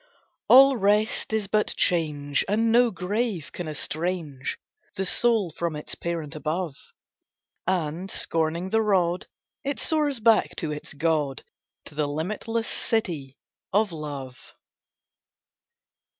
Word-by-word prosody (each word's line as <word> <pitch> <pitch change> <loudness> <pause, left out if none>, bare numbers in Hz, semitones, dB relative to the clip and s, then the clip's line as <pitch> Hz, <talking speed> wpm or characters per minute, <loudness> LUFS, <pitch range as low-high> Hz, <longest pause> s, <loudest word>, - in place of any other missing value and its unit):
All 270 0 +8
rest 210 +2 +2
is 220 -2 0
but 210 +2 +1
change, 150 -5 +1
and 225 +3 +2
no 240 +1 +5
grave 200 -2 -2
can 175 - -5
estrange 155 -2 -3 0.4
The 190 - -1
soul 220 -2 +2
from 170 0 -3
its 150 - -5
Parent 165 -3 -4
above; 155 0 -2 0.9
And, 180 0 -1
scorning 165 +3 -1
the 225 - +3
rod, 185 -4 +1 0.4
it 280 +1 -2
soars 295 -5 +1
back 225 0 +4
to 160 -5 -2
its 150 0 -6
God, 150 -3 0 0.4
To - - -11
the 150 0 0
limitless 215 +9 -2
City 160 - -2 0.3
of 205 0 +2
Love. 145 -5 -7
175 Hz, 120 wpm, -26 LUFS, 155-215 Hz, 0.9 s, All